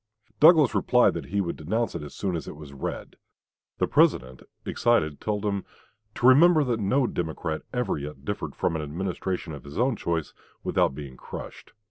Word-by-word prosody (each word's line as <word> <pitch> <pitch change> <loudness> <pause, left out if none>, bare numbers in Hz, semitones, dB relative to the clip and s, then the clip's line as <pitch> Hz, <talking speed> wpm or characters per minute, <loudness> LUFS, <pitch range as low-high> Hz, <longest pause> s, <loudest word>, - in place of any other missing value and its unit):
Douglas 155 -5 +7
replied - - +4
that - - -6
he 100 +2 0
would 85 -3 -3
denounce 110 +8 -1
it - - -5
as 75 - -9
soon 95 -3 -2
as 80 - -5
it - - -7
was 75 -2 -11
read. 70 - -6 0.6
The - - +2
President, 65 0 +2 0.2
excited, 80 -12 +1
told 105 -1 -2
him 100 -2 -1 0.5
"to - - -2
remember 155 +5 +7
that 120 -4 -1
no 125 +7 +2
Democrat 80 -5 -3
ever 125 - -1
yet 70 -1 -8
differed - - -4
from - - 0
an 80 - -2
administration 90 +2 -4
of 70 - -9
his 70 0 -10
own 125 +1 +2
choice 85 -5 -2 0.3
without 65 - +1
being 70 -3 -8
crushed. - - -9
90 Hz, 180 wpm, -26 LUFS, 75-120 Hz, 0.6 s, Douglas